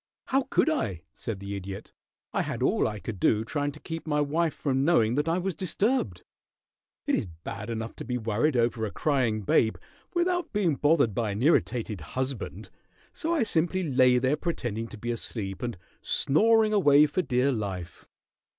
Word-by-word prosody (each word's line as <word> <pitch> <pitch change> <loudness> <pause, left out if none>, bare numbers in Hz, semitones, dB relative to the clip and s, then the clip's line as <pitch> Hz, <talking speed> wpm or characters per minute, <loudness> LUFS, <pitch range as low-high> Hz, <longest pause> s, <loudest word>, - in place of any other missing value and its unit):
"How 265 0 +1
could - - +3
I?" 105 - -1
said 110 -4 -5
the 100 +1 -5
Idiot. 100 +1 -7 0.4
"I - - +1
had - - -3
all - - +2
I 105 - -4
could 105 -1 -6
do 110 +4 +2
trying 145 +3 -1
to 150 - -13
keep 165 0 -6
my 150 -1 +1
wife 155 +3 +1
from 135 -2 0
knowing 140 -8 +3
that 150 +4 0
I 165 - +2
was 185 +1 -1
disturbed. 185 - -1 0.8
It - - 0
is - - +1
bad 90 +6 -8
enough 115 0 -4
to - - -6
be 125 -1 -2
worried 115 +5 +1
over 115 -1 +1
a 110 - -1
crying 120 -6 0
babe, 110 +3 +3 0.4
without 355 0 +1
being 195 -6 +2
bothered 145 -6 +3
by 115 -1 -1
an 100 +4 -2
irritated 115 - +1
husband, 130 - -4 0.4
so 330 - -2
I 305 - +2
simply 175 -1 0
lay 125 0 +5
there 130 +4 +2
pretending 120 - -3
to 110 - -10
be 120 +3 -3
asleep 110 -3 -4
and 120 -5 -3 0.2
snoring 220 +8 +3
away 150 -7 +6
for 150 +5 0
dear 130 -3 +1
life." 95 -7 -5
130 Hz, 180 wpm, -27 LUFS, 110-165 Hz, 0.8 s, away